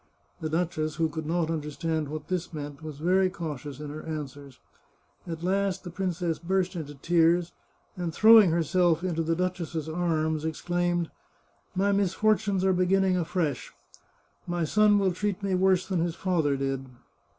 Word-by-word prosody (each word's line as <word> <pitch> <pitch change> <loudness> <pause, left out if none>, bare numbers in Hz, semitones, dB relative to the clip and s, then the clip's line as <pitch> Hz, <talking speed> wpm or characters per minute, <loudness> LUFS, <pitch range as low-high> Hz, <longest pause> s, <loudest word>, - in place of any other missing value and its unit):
The 155 - -3
duchess, 155 -2 -1
who 165 -1 +1
could 160 -1 -5
not 165 0 0
understand 155 0 -2
what 155 +1 -6
this 180 -2 -2
meant, 145 -2 -7
was 155 -2 -7
very 185 +4 +3
cautious 150 -5 -6
in 150 -1 -6
her 155 +1 -7
answers. 145 -4 -7 0.7
At 165 -1 -5
last 195 +1 0
the 175 - -7
princess 175 -2 -2
burst 185 +2 0
into 145 -3 -6
tears, 170 +3 +2 0.4
and 175 -2 -3
throw 220 +6 +8
ing 195 - +3
herself 170 +1 +2
into 170 -3 -1
the 165 +1 0
duchess's 175 -3 -2
arms, 160 -2 0
exclaimed: 175 +2 -1 0.3
" - - -39
My 200 +2 +2
misfortunes 200 0 +1
are 190 - +4
beginning 185 +1 +2
afresh. 165 -6 -2 0.7
My 175 -1 -1
son 210 +5 +4
will 195 -2 +2
treat 200 +2 -2
me 195 -1 0
worse 185 0 +3
than 190 -3 0
his 165 0 -1
father 160 -8 +1
did." 135 -1 -2
170 Hz, 160 wpm, -27 LUFS, 155-185 Hz, 0.7 s, throw